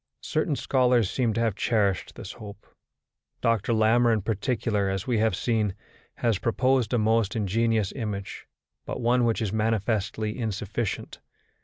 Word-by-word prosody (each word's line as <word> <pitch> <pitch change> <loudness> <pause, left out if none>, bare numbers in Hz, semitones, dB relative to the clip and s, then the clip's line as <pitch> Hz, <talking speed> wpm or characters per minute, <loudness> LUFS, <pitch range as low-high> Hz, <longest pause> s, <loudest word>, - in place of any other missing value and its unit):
Certain 155 -1 0
scholars 125 -6 +2
seem 120 -4 +1
to 115 - -1
have 115 -2 +1
cherished 100 -3 0
this 95 - -7
hope. 105 -3 -11 0.7
Dr. 115 -1 +1
Larmor 115 +2 +4
in 110 -4 +1
particular, 105 -1 0
as 95 -1 -2
we 120 -4 +1
have 110 -3 +2
seen, 105 -1 0 0.4
has 115 -5 0
proposed 125 0 +1
a 125 - +2
most 110 -1 +2
ingenious 110 0 +1
image, 105 -6 -5 0.4
but - - -4
one 120 +1 +2
which 115 0 +1
is 105 -2 -2
manifestly 110 -1 -1
insufficient. 110 -1 -3
110 Hz, 145 wpm, -26 LUFS, 105-120 Hz, 0.7 s, Larmor